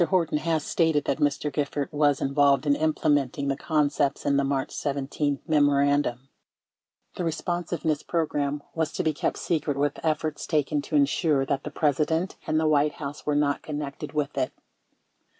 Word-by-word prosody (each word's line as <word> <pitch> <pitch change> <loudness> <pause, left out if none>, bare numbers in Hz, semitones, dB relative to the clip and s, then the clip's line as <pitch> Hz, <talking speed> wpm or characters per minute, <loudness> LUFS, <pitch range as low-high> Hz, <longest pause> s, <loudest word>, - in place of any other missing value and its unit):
Horton 165 -4 +1
has 160 -1 0
stated 160 -3 +1
that - - -1
Mr. 145 0 0
Gifford 145 -1 -2
was 145 -1 +2
involved 140 0 +3
in 145 -1 +3
implementing 145 -3 +1
the 135 - +1
concepts 145 -2 0
in 140 -1 +2
the 140 - +3
March 135 -1 -1
17 140 0 -2
memorandum. 145 -4 +2 0.9
The - - -2
Responsiveness 165 -2 -2
Program 145 -3 -1
was 160 -2 -1
to - - -1
be 155 - +1
kept - - -2
secret 150 -4 -1
with 145 0 -1
efforts 155 -1 -1
taken 150 -2 +1
to 150 - -4
insure 145 0 +2
that 135 0 -1
the - - -3
President 155 +4 0
and 155 0 +2
the 160 - +1
White 150 -1 +3
House 145 0 -7
were 150 - +2
not 145 -1 +1
connected 150 -1 -5
with 150 -1 -1
it. 130 - 0
145 Hz, 165 wpm, -26 LUFS, 140-155 Hz, 0.9 s, involved